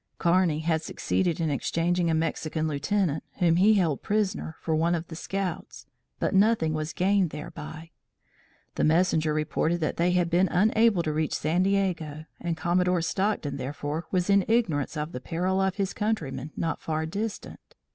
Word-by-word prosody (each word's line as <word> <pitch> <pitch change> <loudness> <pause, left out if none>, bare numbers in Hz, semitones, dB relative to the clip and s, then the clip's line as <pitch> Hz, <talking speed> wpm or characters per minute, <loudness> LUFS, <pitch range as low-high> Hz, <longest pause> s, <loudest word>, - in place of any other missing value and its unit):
Kearney 170 -3 +2
had 160 -1 0
succeeded 175 +1 -1
in 160 -2 0
exchanging 170 +4 0
a 160 - +2
Mexican 160 0 -1
lieutenant, 155 +2 0
whom 170 -2 +2
he 210 +4 +5
held 165 -8 +1
prisoner, 205 -5 -1
for 160 - -1
one 165 +2 +2
of 165 0 -5
the 160 - -7
scouts, 190 0 -4 0.3
but - - -1
nothing 195 -5 +3
was 155 +1 -2
gained 190 0 +2
thereby. 155 +2 -8 0.8
The - - -1
messenger 160 -1 +3
reported 155 +2 0
that 155 - -1
they 175 +1 +2
had 175 -1 +1
been 180 +3 +4
unable 215 0 +3
to 155 - -1
reach 155 0 -1
San 160 +4 +1
Diego, 180 -6 0
and 170 -2 -3
Commodore 180 +1 +1
Stockton, 190 -7 -1
therefore, 145 +4 -4
was 180 -2 0
in 200 -1 +4
ignorance 175 - +1
of 150 +2 -3
the 125 - -6
peril 185 +5 -1
of 190 -1 +1
his 195 -2 -1
countrymen 150 - -2
not 165 -2 -2
far 160 0 -2
distant. 205 +6 -5
170 Hz, 165 wpm, -27 LUFS, 155-190 Hz, 0.8 s, he